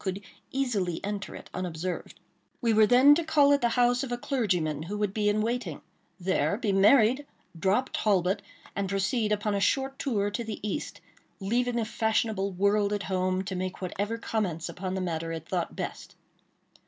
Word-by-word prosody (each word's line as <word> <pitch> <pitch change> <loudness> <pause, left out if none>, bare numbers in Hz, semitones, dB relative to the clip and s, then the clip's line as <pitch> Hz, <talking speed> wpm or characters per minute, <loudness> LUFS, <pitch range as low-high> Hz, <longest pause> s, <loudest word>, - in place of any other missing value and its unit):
could 190 0 -2 0.3
easily 210 -11 -1
enter 205 0 -4
it - - -10
unobserved. 180 0 -4 0.4
We 230 -3 +2
were 215 0 +6
then 255 +5 +7
to 335 +3 +1
call 290 -3 +4
at 285 - +2
the 235 - +3
house 245 0 +4
of 260 - -5
a 245 - -1
clergyman 180 - 0
who 195 +6 -4
would 205 -2 -1
be 210 -1 +1
in 210 +1 +1
waiting; 225 - -2 0.4
there 190 +2 +1
be 225 -4 0
married, 220 +6 +5 0.4
drop 200 +9 +1
Talbot, 195 -1 +1 0.3
and 195 -1 -1
proceed 210 +3 0
on 210 - +1
a 200 - +1
short 270 +6 0
tour 205 -7 0
to 235 +3 -3
the 220 -2 -5
East; 295 - -4 0.4
leaving 240 +5 0
the 230 -2 0
fashionable 215 -2 0
world 200 +2 +2
at 205 -1 -2
home 185 0 0
to 195 0 -5
make 185 0 -3
whatever 205 +4 -3
comments 180 -8 -2
upon 185 +2 -4
the 190 - -2
matter 165 -2 -2
it 165 0 -6
thought 175 -3 -2
best. - - -6
205 Hz, 180 wpm, -28 LUFS, 185-235 Hz, 0.4 s, then